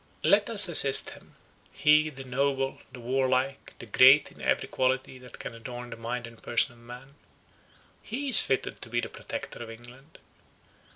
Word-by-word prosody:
"Let 205 +2 +3
us 205 -4 +6
assist 140 -5 +5
him. - - -16 0.4
He, 150 +1 +3
the 135 -2 -10
noble, 135 +1 -2
the 125 - -11
warlike, 130 +2 -2
the - - -11
great 130 +6 +5
in - - -16
every - - -1
quality 130 0 -2
that 125 -1 -13
can - - -8
adorn 120 +1 -9
the - - -6
mind 115 +1 -5
and 115 -1 -14
person 120 +2 +1
of 120 - -21
man; 125 +3 -13 0.9
he 270 +6 -6
is 250 - +5
fitted 135 - -2
to 115 - -8
be 120 +1 -1
the - - -5
Protector - - -8
of 115 - -8
England. 120 +6 -15
130 Hz, 175 wpm, -27 LUFS, 120-140 Hz, 0.9 s, us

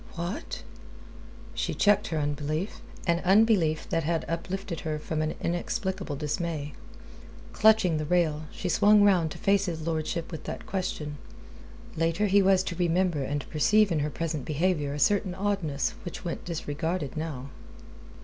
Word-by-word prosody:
"What?" 175 +4 -4 0.9
She - - -2
checked 205 0 +3
her 160 - -2
unbelief, 150 +5 -2 0.2
an 170 -1 +2
unbelief 190 -5 +4
that 165 - 0
had 165 +1 0
uplifted 175 +1 -4
her 155 -1 -3
from 155 +1 -3
an 155 0 -1
inexplicable 185 -1 -2
dismay. 150 0 -3 0.8
Clutching 215 -6 +4
the 155 - -2
rail, 155 -2 +1
she - - -5
swung 205 +4 +5
round 180 -5 +4
to - - -8
face 200 0 +2
his 160 -2 -4
lordship 165 +1 -2
with 160 -3 -7
that - - -6
question. 155 -6 -3 0.8
Later 165 +5 +1
he 200 0 +5
was 190 -1 +4
to 170 - -4
remember 175 -2 +1
and 145 +1 -3
perceive 205 +6 +4
in 160 - +1
her 150 +1 0
present 155 -2 -3
behaviour 150 0 0
a - - -5
certain 195 +1 +2
oddness 190 -8 -1
which 175 - -7
went 170 - -4
disregarded 160 -1 -3
now. 145 -4 -5
165 Hz, 150 wpm, -28 LUFS, 155-190 Hz, 0.9 s, swung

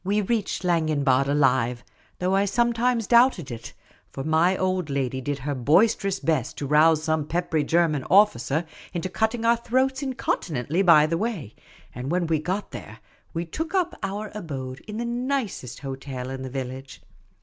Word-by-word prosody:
We 200 +3 +1
reached 210 -1 -1
Schlangenbad 150 -6 +2
alive, 130 -4 +2 0.3
though 180 +1 0
I 195 +1 +3
sometimes 235 +2 +1
doubted 235 - +4
it, 115 -1 -8 0.4
for 135 - -6
my 160 +5 +2
old 185 -3 -1
lady 130 -2 -2
did 145 +2 -2
her 140 +2 -3
boisterous 190 - +2
best 155 -7 -1
to 145 - -3
rouse 155 +2 +4
some 155 -2 0
peppery 165 -2 0
German 160 -3 +1
officer 170 - +3 0.3
into 175 +2 -2
cutting 220 +4 -1
our 235 0 +4
throats 260 +3 0
incon 265 -2 -3 0.2
tinently 155 +4 -1
by 160 -5 +7
the 165 +2 -1
way; 200 - -3 0.4
and 125 +3 -5
when 175 +1 +1
we 160 -1 +1
got 185 +6 -3
there, 105 - -9 0.4
we 170 +1 -2
took 320 - -4
up 360 -2 +1
our 205 +2 -4
abode 135 -9 -6
in 210 0 -6
the 235 - -2
nicest 240 - -3
hotel 135 -2 -6
in 135 0 -5
the 130 - -5
village. 130 +1 -7
165 Hz, 170 wpm, -25 LUFS, 135-210 Hz, 0.4 s, by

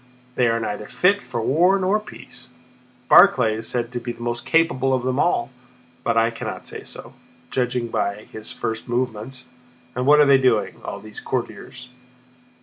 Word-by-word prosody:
They 125 -1 +2
are 115 0 +1
neither 105 -1 -4
fit 200 +3 +2
for 115 - -4
war 175 +10 +3
nor 195 +3 +1
peace! 125 -11 -13 0.6
Barclay 115 -4 +6
is 110 0 -6
said 120 -1 -2
to 125 - -3
be 120 0 -5
the 120 - -9
most 120 0 -4
capable 135 -6 +2
of 125 - -3
them 130 +1 -1
all, 130 -7 +1 0.5
but 115 -1 0
I 115 +1 +3
cannot 115 - -6
say - - -8
so, - - -10 0.4
judging 125 -1 -1
by 100 -1 -2
his 110 0 -7
first 110 +2 -4
movements. 125 +1 -3 0.5
And 125 +2 -2
what 150 +1 +7
are 150 - +7
they 140 -1 +6
doing, 115 -6 +1
all - - -6
these 110 0 -9
courtiers? 125 0 -5
125 Hz, 175 wpm, -22 LUFS, 115-135 Hz, 0.6 s, what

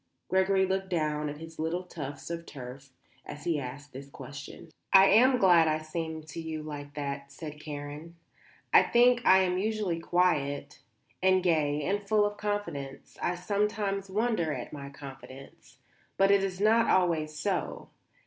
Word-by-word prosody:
Gregory 190 +1 +3
looked 190 0 -2
down 150 -3 -1
at 145 - -7
his 160 0 -11
little 165 +3 -1
tufts 150 -3 -7
of 170 0 -5
turf 135 0 -9 0.3
as 145 0 -9
he 165 -3 0
asked 135 +2 -8
this 135 +2 -9
question. 140 +4 -10 0.2
"I 195 0 +9
am 255 +3 +6
glad 175 -6 +5
I 155 0 +2
seem 160 0 -5
to 155 +2 -7
you 160 -1 -5
like 145 -1 -8
that," 140 -1 -5
said 150 0 -8
Karen. 150 +2 -7 0.6
"I - - +9
think 245 +1 +4
I 190 0 +7
am 180 0 0
usually 210 -5 -1
quiet 165 -5 0 0.4
and 185 0 +4
gay 150 -4 +1
and 200 +6 0
full 210 +1 +2
of 205 0 -3
confidence; 205 -11 -4
I 180 - 0
sometimes 200 +1 -1
wonder 210 -5 0
at - - -6
my 140 -2 -7
confidence. 135 +1 -12 0.4
But 195 0 +4
it 200 -1 +4
is 190 -1 -3
not 225 +3 +4
always 160 -4 +1
so. 185 +2 -2
165 Hz, 160 wpm, -29 LUFS, 145-190 Hz, 0.6 s, I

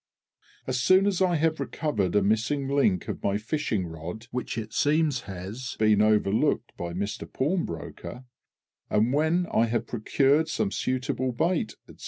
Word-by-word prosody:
As 130 -1 -1
soon 185 +9 +5
as 195 -2 +1
I 180 -2 +3
have 160 0 +1
recovered 105 - -1
a 105 - +4
missing 115 +7 +1
link 135 -10 +2
of - - -4
my 100 0 +1
fishing 110 - -2
rod 85 +7 -7
(which 125 -2 -4
it 110 -1 -5
seems 150 -2 +2
has 100 +8 -6
been 110 -1 +4
overlooked 105 -1 +2
by 85 -1 -5
Mister 100 +4 -4
Pawnbroker), 130 - -3 0.7
and 110 +4 +2
when 160 +5 +2
I 115 - +3
have 115 0 -1
procured 135 +7 +2
some 110 -9 -1
suitable 130 +3 -1
bait, 175 - 0
&c. - - -15
120 Hz, 155 wpm, -27 LUFS, 105-150 Hz, 0.7 s, soon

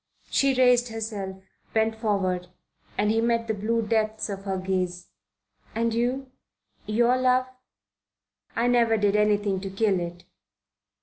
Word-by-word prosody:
She 275 -1 +3
raised 250 -1 +4
herself, 215 -4 -4 0.4
bent 220 0 +3
forward, 195 -5 -1 0.5
and 210 +1 +2
he 225 +1 +2
met 230 0 +1
the 220 - 0
blue 225 +3 0
depths 220 0 0
of 195 0 -6
her 190 -1 -1
gaze. 185 -1 -2 0.7
"And 230 0 +1
you? 255 +3 -1 0.6
Your 235 +3 +3
love?" 255 0 +3 1.1
"I 230 - +1
never 235 -2 +3
did 205 -1 +2
anything 205 -2 +2
to 195 - -4
kill 195 -1 +1
it." 175 0 -6
220 Hz, 135 wpm, -26 LUFS, 195-235 Hz, 1.1 s, raised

